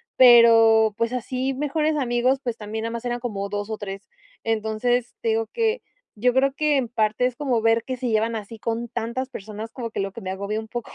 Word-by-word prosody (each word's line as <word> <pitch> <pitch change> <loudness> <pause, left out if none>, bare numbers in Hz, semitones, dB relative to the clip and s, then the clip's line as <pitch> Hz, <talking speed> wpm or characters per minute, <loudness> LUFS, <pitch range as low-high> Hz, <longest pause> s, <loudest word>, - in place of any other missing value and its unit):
pero 225 -3 +7
pues 230 +1 0
así 255 +2 -2
mejores 300 +2 0
amigos, 255 0 +1
pues 240 -2 -2
también 220 +1 -5
nada 230 - -3
más 235 +1 -6
eran 240 0 -2
como 200 -5 -4
2 205 +1 -4
o 215 - -3
3. 195 -1 -7 0.4
Entonces, 225 +2 -1
te 225 - 0
digo 225 0 0
que 450 - -1 0.3
yo 245 +3 +2
creo 270 +1 +2
que 300 -1 +1
en 250 -3 0
parte 220 +1 +1
es 250 -1 -1
como 250 -5 0
ver 225 0 +3
que 255 -1 -4
se 250 -1 -2
llevan 225 +1 +1
así 220 +1 -7
con 230 +1 -3
tantas 255 +4 -3
personas, 215 +1 -8
como 235 -3 -5
que - - -4
lo 195 0 -3
que - - -9
me 185 - -5
agobia 200 +3 -3
un 220 - -8
poco. 240 0 -6
230 Hz, 225 wpm, -23 LUFS, 220-250 Hz, 0.4 s, pero